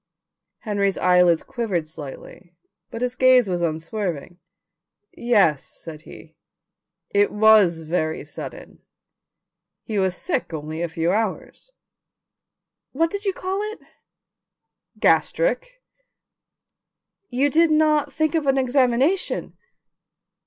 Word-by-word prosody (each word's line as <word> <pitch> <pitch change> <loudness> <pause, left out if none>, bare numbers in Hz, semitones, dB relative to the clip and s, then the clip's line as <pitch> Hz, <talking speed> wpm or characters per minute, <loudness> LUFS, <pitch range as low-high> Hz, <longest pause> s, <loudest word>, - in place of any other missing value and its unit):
Henry's 200 -3 -1
eyelids 180 -2 +3
quivered 190 -9 -3
slightly 155 +4 -11 0.3
but 230 +2 -5
his 250 0 -1
gaze 255 -2 +4
was 175 -2 -2
unswerving. 170 +1 -4 0.8
"Yes," 205 - +2
said 155 -2 -11
he; 160 0 -14 0.8
"it 205 0 +2
was 210 -6 +4
very 160 -1 -2
sudden. - - -10 1.0
He 215 -3 -2
was 190 -1 0
sick 255 - -3
only 155 +2 -6
a 170 - -2
few 165 +1 -1
hours." 220 - -3 1.2
"What 325 +4 +1
did 405 +1 -5
you 390 - +1
call 375 +2 -3
it?" - - -14 1.2
"Gastric." - - +1 1.5
"You 270 +3 +1
did 330 +2 +4
not 305 -2 +2
think 310 -1 0
of 315 -4 0
an 270 0 +3
examination?" 265 +6 +1
215 Hz, 105 wpm, -22 LUFS, 170-285 Hz, 1.5 s, gaze